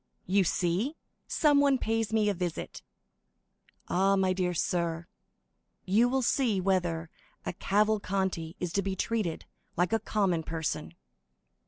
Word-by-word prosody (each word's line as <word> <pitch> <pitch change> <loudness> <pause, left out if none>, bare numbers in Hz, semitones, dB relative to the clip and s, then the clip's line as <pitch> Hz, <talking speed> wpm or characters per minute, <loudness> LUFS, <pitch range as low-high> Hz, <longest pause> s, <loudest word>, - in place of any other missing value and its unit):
"You 195 +2 +3
see 185 - 0 0.3
someone 285 -3 +4
pays 225 -2 -1
me 220 -1 +2
a 205 - +2
visit. 175 -2 -4 1.1
Ah, 195 +2 +3
my 190 -1 +2
dear 180 -1 0
sir, 170 0 -1 0.8
you 220 +6 +4
will 265 0 +1
see 235 -5 +2
whether 175 -4 0 0.3
a - - -2
Cavalcanti 195 -4 0
is 175 -2 -3
to 200 - +2
be 195 0 -2
treated 210 -5 -2 0.3
like 175 +4 +1
a 225 - +3
common 195 -8 0
person!" 160 - -4
190 Hz, 130 wpm, -29 LUFS, 175-220 Hz, 1.1 s, someone